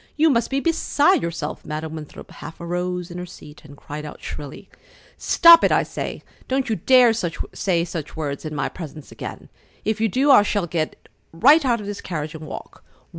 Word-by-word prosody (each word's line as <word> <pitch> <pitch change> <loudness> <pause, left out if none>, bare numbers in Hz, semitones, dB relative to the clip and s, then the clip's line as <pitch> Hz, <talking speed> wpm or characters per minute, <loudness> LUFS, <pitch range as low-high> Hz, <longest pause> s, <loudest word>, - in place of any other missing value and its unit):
You 315 0 +4
must 230 -3 +1
be 275 - 0
beside 330 +1 +2
yourself!" 165 -3 -4
Madam 155 +1 -5
Winthrop 155 -2 -9
half 155 +2 -10
arose 180 +1 -3
in 175 - -6
her 180 - -5
seat 150 -3 -13
and 145 -1 -14
cried 150 +2 -8
out 150 - -9
shrilly: 145 -1 -8 0.5
"Stop 335 0 +7
it, - - +4
I - - +3
say! - - -6 0.2
Don't 265 -1 -1
you 220 - 0
dare 245 +5 +5
say 170 -2 -2
such 165 -3 -6
words 145 -3 -4
in 155 -1 -5
my 145 - -1
presence 155 -4 -9
again! - - -8 0.4
If 220 0 -1
you 225 - +3
do, 270 +8 +3
I 260 - +8
shall 205 -2 0
get 160 -2 -4 0.2
right 285 - +5
out 240 -3 +1
of 210 - -7
this 205 0 -6
carriage 155 -3 -5
and 155 -1 -9
walk! - - -9
175 Hz, 195 wpm, -22 LUFS, 155-235 Hz, 0.5 s, I